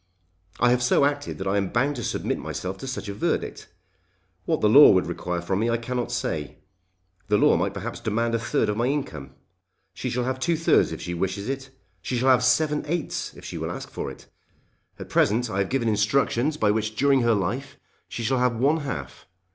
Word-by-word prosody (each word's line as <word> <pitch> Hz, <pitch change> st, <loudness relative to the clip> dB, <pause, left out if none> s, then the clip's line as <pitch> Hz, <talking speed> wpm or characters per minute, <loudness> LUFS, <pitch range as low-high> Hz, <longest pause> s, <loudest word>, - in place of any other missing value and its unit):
I 120 Hz, 0 st, +4 dB
have 125 Hz, 0 st, +2 dB
so 125 Hz, +3 st, +3 dB
acted 145 Hz, 0 st, -2 dB
that 95 Hz, -, -5 dB
I 100 Hz, +1 st, +1 dB
am 100 Hz, -2 st, 0 dB
bound 140 Hz, +5 st, +1 dB
to 120 Hz, -, -4 dB
submit -, -, -2 dB
myself 95 Hz, +1 st, -5 dB
to 135 Hz, -, -7 dB
such 130 Hz, -4 st, -5 dB
a 100 Hz, -, -4 dB
verdict. 105 Hz, -, -2 dB, 0.8 s
What -, -, 0 dB
the -, -, +4 dB
law -, -, +9 dB
would -, -, +4 dB
require 90 Hz, -1 st, -3 dB
from 95 Hz, +3 st, -1 dB
me 115 Hz, +2 st, +1 dB
I 115 Hz, -, +1 dB
cannot 120 Hz, +1 st, -3 dB
say. 75 Hz, -2 st, -3 dB, 0.7 s
The 105 Hz, 0 st, +3 dB
law -, -, +5 dB
might -, -, -1 dB
perhaps -, -, -5 dB
demand 115 Hz, 0 st, -1 dB
a 115 Hz, -, +1 dB
third 115 Hz, -, 0 dB
of 105 Hz, -, -1 dB
my 120 Hz, +2 st, +1 dB
income. 80 Hz, -, -4 dB, 0.6 s
She -, -, -4 dB
shall 125 Hz, +1 st, -1 dB
have 130 Hz, +1 st, -2 dB
two 165 Hz, +5 st, +1 dB
thirds 165 Hz, -, +3 dB
if -, -, -6 dB
she 85 Hz, -, -4 dB
wishes 95 Hz, +3 st, -2 dB
it. 135 Hz, 0 st, -4 dB, 0.3 s
She 125 Hz, +5 st, -2 dB
shall 130 Hz, +3 st, +2 dB
have 125 Hz, -1 st, +5 dB
seven 150 Hz, +4 st, +2 dB
eighths 170 Hz, +1 st, -3 dB
if -, -, -12 dB
she -, -, -6 dB
will -, -, -3 dB
ask -, -, -7 dB
for -, -, -4 dB
it. -, -, -12 dB, 0.7 s
At -, -, -8 dB
present 110 Hz, +2 st, +2 dB
I 95 Hz, -, -1 dB
have 95 Hz, -, 0 dB
given 130 Hz, -3 st, 0 dB
instructions 120 Hz, +6 st, +1 dB
by 105 Hz, -5 st, +3 dB
which 110 Hz, 0 st, -2 dB
during 140 Hz, 0 st, +3 dB
her 120 Hz, -1 st, +3 dB
life 115 Hz, +9 st, -3 dB, 0.3 s
she 115 Hz, -, -5 dB
shall 130 Hz, +3 st, +1 dB
have 125 Hz, -1 st, +2 dB
one 140 Hz, +7 st, +2 dB
half. 140 Hz, -4 st, -6 dB
120 Hz, 220 wpm, -25 LUFS, 105-135 Hz, 0.8 s, law